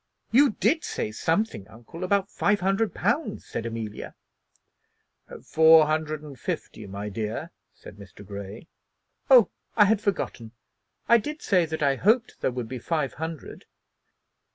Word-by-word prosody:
"You 270 0 +5
did 280 - +1
say 105 - -3
something, 160 - -1
uncle, 120 +11 -11
about 200 +1 0
five 205 0 +1
hundred 195 +4 0
pounds," 315 - -1
said 115 - -5
Amelia. 110 -2 -6 1.3
"Four 160 0 +6
hundred 155 0 -2
and 140 -5 -11
fifty, - - -5
my 100 +2 -6
dear," 105 +1 -4 0.2
said - - -13
Mr. 100 0 -13
Grey. 100 - -8 0.6
"Oh, 250 -5 +7 0.2
I 210 - +6
had 210 0 +2
forgotten. 120 - -3 0.5
I 235 - +6
did 300 +7 -6
say 180 -4 +2
that 160 -1 -3
I 140 -1 +2
hoped 230 - +1
there - - +1
would 125 -2 -5
be 130 +1 -6
five 150 +1 -2
hundred." 160 -1 -7
160 Hz, 145 wpm, -26 LUFS, -, 1.3 s, Oh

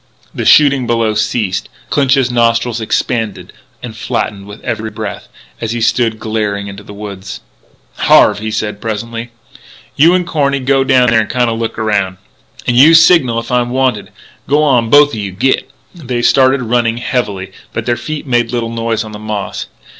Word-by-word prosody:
The - - -4
shooting 140 -4 +5
below 115 -2 +1
ceased. 105 -2 -1 0.2
Clinch's 135 -3 +2
nostrils 115 -1 +1
expanded 110 -2 -2 0.3
and 115 -3 -7
flattened 100 -2 -3
with 105 +2 -10
every 110 -2 -3
breath, - - -7 0.3
as 115 -1 -2
he 120 - -3
stood 115 0 +1
glaring 105 -2 -2
into 100 0 -8
the 105 - -13
woods. 100 -2 -8 0.6
"Harve," - - +4
he 110 +1 -4
said 105 -1 -3
presently, 115 +2 -4 0.7
"you 165 +5 +5
an' 180 -1 0
Corny 140 -5 0
go 135 +1 +2
down 130 -3 +3
there 110 -1 +4
an' 105 - -4
kinda 120 -2 +1
look 115 0 -4
around. 100 -4 -1 0.5
And 125 - +1
you 150 +7 +7
signal 160 -8 +5
if 115 +2 -4
I'm 125 -1 +1
wanted. 130 0 -1 0.4
G'wan, 140 -6 +2
both 145 +2 +5
o' 110 - -4
you. 100 -2 -5
Git!" 130 +7 0 0.2
They 125 -8 -4
started, 130 +1 +3
running 115 0 0
heavily, 100 -6 -3 0.2
but 110 - -4
their 120 - +1
feet 155 +4 -6
made 120 -3 0
little 115 -2 -2
noise 115 -1 -2
on 110 - -9
the 105 - -8
moss. 105 -2 -5
115 Hz, 170 wpm, -14 LUFS, 110-130 Hz, 0.7 s, you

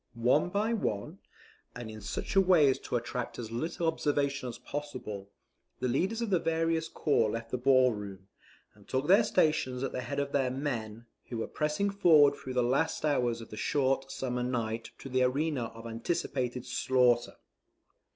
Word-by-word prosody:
One 125 +8 +2
by 210 +5 0
one, 105 - -3 0.6
and 115 -2 -7
in 110 0 -9
such 100 - -4
a 195 - +7
way 180 -6 +5
as - - -3
to - - -4
attract 120 0 -3
as 115 -2 -6
little 160 +8 -2
observation 140 -4 0
as 115 - -7
possible, 125 -9 -6 0.5
the 125 - 0
leaders 190 - 0
of 220 - -3
the 180 - +4
various 165 0 0
corps 140 -9 +1
left 115 +1 -5
the 125 - -1
ball 130 0 +5
room, 100 -2 -8 0.5
and 105 -1 -21
took 130 +2 -1
their 200 +6 +6
stations 150 -10 +1
at 135 - -2
the 125 - -3
head 140 +3 -5
of 140 0 -2
their 135 -3 +1
men, 120 -5 -4 0.2
who 120 - -4
were 115 - -2
pressing 155 +7 -1
forward 155 -7 +6
through 130 -2 -7
the 125 - +3
last 145 +6 0
hours 120 -6 +1
of 115 - -11
the 105 - -7
short 135 0 0
summer 125 -2 -3
night 115 -2 -2
to - - -9
the 130 -1 0
arena 135 0 +1
of 115 0 -10
anticipated 125 +1 -2
slaughter. 125 -2 +2
130 Hz, 180 wpm, -30 LUFS, 120-150 Hz, 0.6 s, a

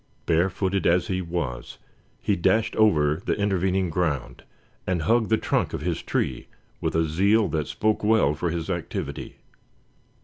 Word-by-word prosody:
Barefooted 95 +2 +1
as 85 +1 +2
he 95 -1 0
was, 85 -8 -4 0.5
he 105 - +2
dashed 110 +5 +1
over 80 -7 +3
the - - 0
intervening 95 -3 0
ground, 75 -6 -2 0.5
and 90 -4 0
hugged 115 +5 +2
the 110 - +4
trunk - - -1
of - - -3
his - - -2
tree - - -2 0.3
with - - -2
a 80 0 +3
zeal 100 +7 +3
that 75 -3 -2
spoke 110 0 0
well 105 -9 +3
for 80 +3 -2
his 80 -1 -3
activity. 90 -4 -4
90 Hz, 150 wpm, -25 LUFS, 80-100 Hz, 0.5 s, the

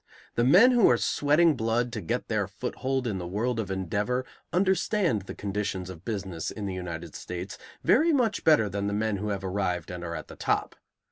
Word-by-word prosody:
The 120 - +1
men 185 - +7
who 240 -4 +5
are 120 - +4
sweating 150 +6 +3
blood 120 +1 0
to 110 - -3
get 120 +4 -2
their 105 -3 0
foothold 130 +5 -3
in 105 -5 -2
the 90 - -5
world 115 +6 -1
of 105 -4 -3
endeavor 100 +7 -1 0.3
understand 190 - +2
the 95 - -8
conditions 95 -2 -3
of 85 -2 -12
business 95 -7 -4
in 105 - -6
the 95 - -3
United 85 -3 -6
States 90 +2 -6 0.3
very 330 +2 +4
much 240 -8 +1
better 150 -9 +5
than 100 +1 -2
the 100 - -1
men 105 0 0
who 105 +2 -3
have 100 -2 -3
arrived 90 -3 -2
and 90 0 -6
are 85 -1 -4
at 80 - -7
the - - -11
top. - - -1
105 Hz, 205 wpm, -27 LUFS, 95-130 Hz, 0.3 s, men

